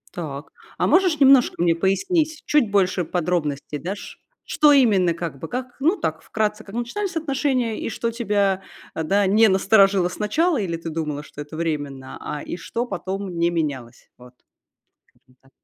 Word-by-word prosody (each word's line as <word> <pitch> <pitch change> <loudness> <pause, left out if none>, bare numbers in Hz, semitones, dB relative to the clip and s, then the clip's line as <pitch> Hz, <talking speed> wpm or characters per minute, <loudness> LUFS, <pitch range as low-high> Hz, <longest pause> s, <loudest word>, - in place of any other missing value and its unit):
Так. 150 -4 -6 0.3
А - - +1
можешь 360 -5 +3
немножко 270 - +5
мне 170 -1 +3
пояснить, 310 - 0
чуть 280 -9 +2
больше 185 -2 +2
подробностей 155 -4 -2
дашь? 195 +6 -6 0.3
Что 300 -1 +4
именно 205 -11 +4
как 165 -5 -6
бы, 160 - -6
как, 250 0 -5
ну 335 +8 +3
так, 160 - -3
вкратце, 215 0 -2
как 200 - -13
начинались 335 +10 -3
отношения, 270 -6 -1
и - - -3
что 230 +1 -2
тебя, 205 -4 0 0.3
а, - - -3
да, 200 +5 +2
не 220 +3 +5
насторожило 195 -1 +4
сначала, 290 - 0
или 175 -7 -2
ты 165 0 -6
думала, 150 -2 -3
что 145 - -10
это 150 +2 -9
временно, 145 -5 -4
а, 145 - -5
и - - -5
что 230 +7 -4
потом 190 -5 -5
не 170 0 +3
менялось, 140 -8 -4
вот. 125 0 -15 0.8
Скажем 125 +1 -29
так. 135 - -25
195 Hz, 170 wpm, -22 LUFS, 165-240 Hz, 0.8 s, немножко